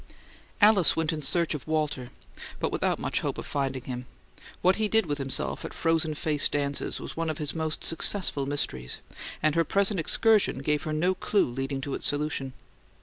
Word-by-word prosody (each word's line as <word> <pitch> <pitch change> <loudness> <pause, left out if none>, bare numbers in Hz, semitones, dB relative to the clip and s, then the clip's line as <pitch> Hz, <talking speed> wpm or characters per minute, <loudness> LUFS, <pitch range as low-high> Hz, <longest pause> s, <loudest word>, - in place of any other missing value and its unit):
Alice 205 -4 +6
went 165 0 0
in 155 - -4
search 170 +4 +1
of 150 -1 -6
Walter, 150 -5 -1 0.5
but - - -1
without - - 0
much - - -1
hope - - -3
of - - -6
finding 135 -3 -2
him. 125 -1 -6 0.6
What 185 +1 +4
he 215 -1 +1
did 220 0 +3
with 145 -2 -2
himself 135 -1 +1
at - - -7
frozen 165 -2 +1
face 150 -1 +2
dances 140 -1 -1
was - - -7
one 165 0 -1
of 155 - -3
his 150 -2 -1
most 160 -1 -2
successful 165 -4 0
mysteries, 65 - -2 0.5
and 155 - +3
her 165 - +3
present 200 +3 +1
excursion 215 - +3
gave 150 0 +1
her 155 - -2
no 175 +5 +2
clue 200 +2 +1
leading 135 +2 -3
to 140 0 -4
its - - +1
solution. 145 -2 -2
155 Hz, 190 wpm, -27 LUFS, 140-170 Hz, 0.6 s, Alice